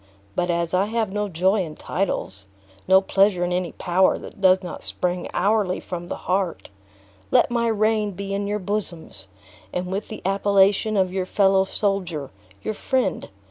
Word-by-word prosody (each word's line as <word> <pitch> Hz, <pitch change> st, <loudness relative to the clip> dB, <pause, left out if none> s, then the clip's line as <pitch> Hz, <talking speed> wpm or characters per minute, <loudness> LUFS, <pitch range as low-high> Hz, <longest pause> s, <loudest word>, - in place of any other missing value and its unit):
But 175 Hz, -, 0 dB
as 170 Hz, 0 st, 0 dB
I 185 Hz, +2 st, +3 dB
have 220 Hz, -3 st, -1 dB
no 210 Hz, 0 st, -1 dB
joy 190 Hz, +4 st, +2 dB
in 155 Hz, -4 st, -5 dB
titles, 100 Hz, -, -3 dB, 0.4 s
no 190 Hz, +1 st, +6 dB
pleasure 195 Hz, -1 st, +2 dB
in 175 Hz, 0 st, 0 dB
any 180 Hz, -1 st, -2 dB
power 185 Hz, +1 st, +2 dB
that -, -, -11 dB
does 185 Hz, -1 st, +5 dB
not 180 Hz, -, -7 dB
spring 180 Hz, 0 st, -2 dB
hourly 200 Hz, -1 st, +1 dB
from 175 Hz, -1 st, -6 dB
the -, -, -4 dB
heart, 180 Hz, -, -1 dB, 0.6 s
let -, -, +4 dB
my 235 Hz, -1 st, +1 dB
reign 215 Hz, -1 st, +1 dB
be 195 Hz, +1 st, -5 dB
in 200 Hz, 0 st, -1 dB
your 205 Hz, +1 st, -1 dB
bosoms; 180 Hz, -, -4 dB, 0.4 s
and 180 Hz, 0 st, -2 dB
with 200 Hz, +3 st, -3 dB
the 215 Hz, -, -8 dB
appellation 200 Hz, +2 st, +3 dB
of 185 Hz, -1 st, +1 dB
your 185 Hz, -1 st, -2 dB
fellow 195 Hz, 0 st, +3 dB
soldier, 185 Hz, -8 st, -2 dB, 0.3 s
your 215 Hz, -, -2 dB
friend! 245 Hz, -3 st, -1 dB
190 Hz, 170 wpm, -23 LUFS, 180-205 Hz, 0.6 s, no